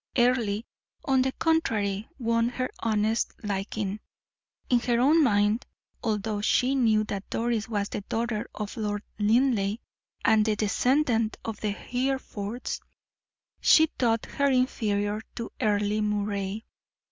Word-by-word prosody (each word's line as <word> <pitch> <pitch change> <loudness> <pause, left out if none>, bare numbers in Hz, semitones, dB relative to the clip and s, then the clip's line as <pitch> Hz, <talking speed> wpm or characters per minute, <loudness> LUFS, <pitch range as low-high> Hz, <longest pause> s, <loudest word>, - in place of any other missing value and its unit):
Earle, 240 -4 +2 0.4
on 265 -2 +3
the 260 +1 +1
contrary, 220 -11 0
won 230 -2 +1
her 255 +1 -3
honest 220 0 0
liking. 200 0 -3 0.7
In 245 - +4
her 235 0 +1
own 305 +6 +5
mind, 210 -1 +2 0.4
although 215 -1 -1
she 250 +5 +2
knew 225 -5 +3
that 200 -2 -5
Doris 230 -1 -1
was 205 -3 -1
the - - -4
daughter 225 -2 -1
of 210 +2 -5
Lord 210 -1 -2 0.2
Linleigh, 215 -2 +2 0.5
and 215 -1 +5
the 215 0 +1
descendant 230 +2 +1
of 225 -2 -5
the 215 - 0
Herefords, 245 -1 -3 0.8
she 315 -1 +6
thought 230 -2 +2
her 280 0 0
inferior 215 -5 0
to 230 - -5
Earle 210 0 +1
Moray. 205 0 -2
220 Hz, 125 wpm, -27 LUFS, 205-245 Hz, 0.8 s, she